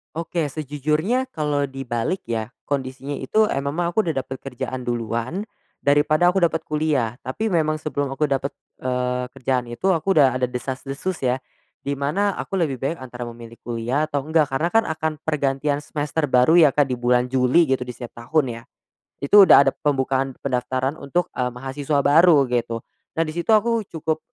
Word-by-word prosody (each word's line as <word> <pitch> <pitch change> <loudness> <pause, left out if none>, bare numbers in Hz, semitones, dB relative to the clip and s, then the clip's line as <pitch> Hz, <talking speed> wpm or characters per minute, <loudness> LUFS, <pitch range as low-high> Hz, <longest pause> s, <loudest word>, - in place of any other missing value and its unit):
Oke, 165 -2 -2
sejujurnya 155 - -1
kalau 145 - -1
dibalik 135 +7 -3
ya, 115 -1 -3 0.2
kondisinya 135 0 -3
itu, 215 +12 +2
eee, 135 -8 -1
memang 170 +5 -2
aku 220 - +3
udah 160 -7 -2
dapet 130 0 -6
kerjaan 130 -1 -5
duluan 120 - -3 0.3
daripada 150 +4 +3
aku 190 - +1
dapat 160 -1 +1
kuliah. 150 -7 0
Tapi 210 +13 -3
memang 155 -5 +1
sebelum 145 -3 -3
aku 135 +3 0
dapat, 140 0 -1 0.3
eee, 125 0 -1
kerjaan 125 -2 -2
itu 120 +11 -4
aku 165 +3 -1
udah 130 -3 +5
ada 125 -1 -1
desas-desus 135 +7 -4
ya, 125 0 +1 0.4
di 140 - -3
mana 185 +9 0
aku 195 - -3
lebih 140 -7 -1
baik 150 +5 -1
antara 125 -1 -8
memilih 115 -1 -8
kuliah 120 +5 -1
atau 145 -1 -2
enggak 155 -2 +2
karena 155 +6 0
kan 225 - +5
akan 160 0 -1
pergantian 145 -2 0
semester 150 +1 -2
baru 130 +6 +5
ya 150 -5 +6
Kak, 145 -3 +2
di 125 - -1
bulan 125 +1 +2
Juli 130 +4 +3
gitu 130 -1 0
di 125 - -6
setiap 120 -1 -10
tahun 150 -2 +2
ya. - - -13 0.6
Itu 195 +7 +7
udah 140 - +8
ada - - +2
pembukaan 135 -2 0
pendaftaran 130 +2 -1
untuk, 175 +6 -1
eee, 125 - +2
mahasiswa 140 +2 -1
baru 155 0 +6
gitu 115 -2 -1 0.3
dan 165 - +2
di 155 - -5
situ 170 +7 +2
aku 230 +2 +2
cukup 160 -1 -2
140 Hz, 180 wpm, -22 LUFS, 125-160 Hz, 0.6 s, udah